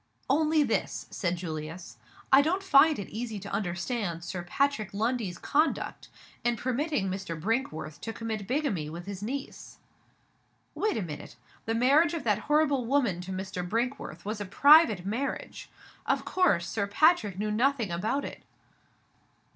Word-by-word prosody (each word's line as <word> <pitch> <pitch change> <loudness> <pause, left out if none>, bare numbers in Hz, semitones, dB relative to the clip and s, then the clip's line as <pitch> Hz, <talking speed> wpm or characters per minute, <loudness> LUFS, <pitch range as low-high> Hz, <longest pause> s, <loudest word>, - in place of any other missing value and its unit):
"Only 310 +1 +3
this," 235 -5 -1
said 180 -3 -1
Julius. 165 0 -6 0.4
"I 270 - +9
don't 360 +6 0
find 310 -3 +6
it 200 - -5
easy 225 0 -4
to 200 +1 -8
understand 175 -1 -2
Sir 180 0 -4
Patrick 220 +3 0
Lundie's 220 -4 -1
conduct 305 +3 -1 0.3
in 240 0 +2
permitting 260 -2 -1
Mr. 185 -4 -4
Brinkworth 160 - -2
to 225 - -4
commit 220 -3 -5
bigamy 245 - -1
with 170 +2 -8
his 200 -1 -6
niece." 270 +6 -6 1.0
"Wait 430 - 0
a 215 - -1
minute! 150 -4 -8 0.3
The 225 - -1
marriage 290 +8 +4
of 320 - -4
that 210 -3 +2
horrible 295 -3 +3
woman 235 -9 +1
to 180 +1 -7
Mr. 190 -1 -4
Brinkworth 225 - -3
was 210 0 -3
a - - -3
private 230 - +6
marriage. 240 +8 -4 0.4
Of - - +1
course, 290 - +2
Sir 200 +1 -1
Patrick 215 - +3
knew 210 +1 -1
nothing 235 -2 +1
about 215 +11 -1
it!" - - -8
220 Hz, 150 wpm, -28 LUFS, 185-280 Hz, 1.0 s, I